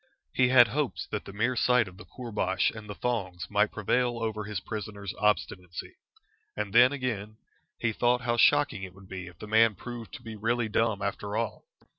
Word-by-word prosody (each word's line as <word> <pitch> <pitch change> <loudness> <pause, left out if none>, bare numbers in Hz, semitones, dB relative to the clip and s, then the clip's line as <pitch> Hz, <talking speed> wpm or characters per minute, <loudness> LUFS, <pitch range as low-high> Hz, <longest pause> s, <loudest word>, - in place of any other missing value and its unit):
He 125 - +4
had 120 -2 +7
hopes 140 +3 -1
that - - -3
the - - -8
mere 115 +6 0
sight 125 -3 +3
of 90 0 -12
the - - -11
koorbash 105 -7 -1
and 105 -1 -9
the 105 - -5
thongs 95 -8 -2
might 105 +1 +3
prevail 120 +3 +1
over 110 -2 -2
his 105 -3 -3
prisoner's 100 0 -6
obstinacy. 90 -4 -1 0.6
And 105 -1 -3
then, 120 +3 +7
again, 110 -6 -3 0.4
he 115 -2 0
thought 120 +3 +2
how 120 -1 0
shocking 145 -5 +4
it 95 -1 -8
would 95 0 -15
be 90 -1 -6
if 90 -2 -12
the - - -8
man 110 0 +4
proved 120 +2 -8
to - - -11
be 115 -2 -7
really 115 +2 0
dumb 110 -2 +1
after 100 +1 -3
all. 115 -2 -3
110 Hz, 195 wpm, -29 LUFS, 100-120 Hz, 0.6 s, had